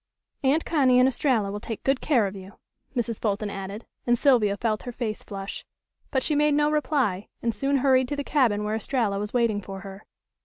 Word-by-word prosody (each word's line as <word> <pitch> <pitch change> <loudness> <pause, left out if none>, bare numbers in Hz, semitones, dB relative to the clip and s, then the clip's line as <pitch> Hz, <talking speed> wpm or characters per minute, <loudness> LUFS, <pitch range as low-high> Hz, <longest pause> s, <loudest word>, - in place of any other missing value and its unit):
"Aunt 280 +4 +2
Connie 265 -6 +3
and 255 - +6
Estralla 245 -6 +1
will 205 - -4
take 225 0 -6
good 270 -1 +1
care 250 -8 +3
of 195 0 -4
you," 190 0 -10 0.4
Mrs. 235 -2 -2
Fulton 205 -1 -1
added, 195 +3 -6 0.2
and 240 0 +4
Sylvia 230 -7 +3
felt 215 -2 -1
her 245 - -6
face 230 -3 -4
flush. 195 -1 -7 0.5
But 265 -3 0
she 310 - +1
made 295 0 +3
no 295 0 +3
reply, 275 -10 0 0.2
and 230 -1 +1
soon 275 +6 +1
hurried 260 -1 +3
to 290 - -2
the 285 - -3
cabin 235 -9 +2
where 210 +1 -2
Estralla 220 -3 -1
was 210 0 -4
waiting 230 -4 +1
for 195 0 -8
her. 195 +1 -10
235 Hz, 205 wpm, -26 LUFS, 205-270 Hz, 0.5 s, and